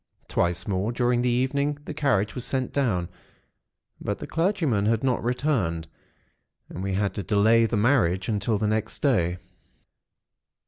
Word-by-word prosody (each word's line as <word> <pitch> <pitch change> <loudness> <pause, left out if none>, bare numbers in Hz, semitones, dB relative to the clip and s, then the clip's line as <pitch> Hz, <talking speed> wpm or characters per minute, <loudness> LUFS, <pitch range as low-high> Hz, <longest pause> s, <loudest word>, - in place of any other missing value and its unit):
Twice 85 0 0
more 100 +2 0
during 120 0 +1
the 125 - +1
evening 140 +4 0
the - - -5
carriage 120 -9 +1
was 125 - -4
sent 130 -1 -2
down; 105 -11 0 0.9
but - - -2
the - - -7
clergyman 165 - 0
had 115 +1 +1
not 130 -2 +1
returned; 115 - 0 0.8
and 90 - -7
we 95 0 -2
had 100 0 0
to 105 - -3
delay 110 +4 +3
the 115 - -1
marriage 100 -6 +2
until 105 0 0
the 105 - -1
next 110 +1 -2
day. 90 - +2
115 Hz, 150 wpm, -25 LUFS, 100-130 Hz, 0.9 s, delay